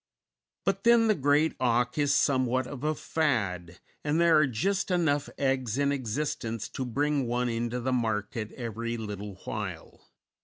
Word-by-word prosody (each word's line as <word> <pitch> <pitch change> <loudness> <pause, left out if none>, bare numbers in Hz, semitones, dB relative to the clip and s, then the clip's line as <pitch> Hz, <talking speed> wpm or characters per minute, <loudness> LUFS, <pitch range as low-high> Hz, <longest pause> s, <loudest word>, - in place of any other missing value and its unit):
But 195 +1 0
then, 235 -1 +5
the 215 - +5
great 145 0 +2
auk 125 -1 +1
is 145 -1 +3
somewhat 130 -2 +2
of 140 0 -8
a 155 0 +1
fad, 100 - -1 0.3
and 150 +2 +1
there 170 -1 +5
are 150 - +4
just 190 - -1
enough 155 -6 +1
eggs 130 -4 0
in 140 0 +2
existence 120 -3 -2
to 130 - -4
bring 140 +2 0
one 120 +1 0
into 120 +1 -2
the 130 +2 -1
market 110 -2 -1
every 115 -1 -4
little 105 -2 -6
while. - - -6
130 Hz, 155 wpm, -28 LUFS, 115-150 Hz, 0.3 s, then